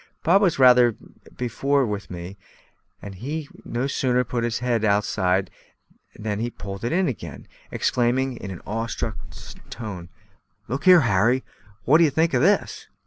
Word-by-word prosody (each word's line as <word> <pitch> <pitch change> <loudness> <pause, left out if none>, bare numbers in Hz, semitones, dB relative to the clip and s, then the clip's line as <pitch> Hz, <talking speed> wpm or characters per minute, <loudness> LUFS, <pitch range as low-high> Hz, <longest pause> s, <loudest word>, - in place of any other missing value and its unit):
Bob 190 +5 +4
was 185 -5 +2
rather 125 -3 +6 0.4
beforehand 130 +1 0
with 100 -1 -5
me, 90 +2 -8 0.7
and 100 - -7
he 145 - -5
had 140 - -19
no 120 +3 -2
sooner 125 -2 +1
put 120 0 -3
his 115 -1 -1
head 120 -2 -1
outside 100 -3 +1 0.6
than 105 -1 -4
he 120 +2 -2
pulled 100 -3 -8
it 120 - -1
in 185 +2 +2
again, 85 - -6 0.2
exclaiming, 125 +2 0
in 100 - -7
an 95 -3 -8
awe 115 +2 -3
struck 115 - -4 0.5
tone: 95 -7 -7 0.6
"Look 135 +6 -4
here, 180 -2 +8
Harry; 115 +3 +2 0.4
what 155 +5 +5
d'ye 165 -3 +5
think 160 +3 +1
of 125 - +2
this?" 200 +6 +1
120 Hz, 160 wpm, -23 LUFS, 105-135 Hz, 0.7 s, here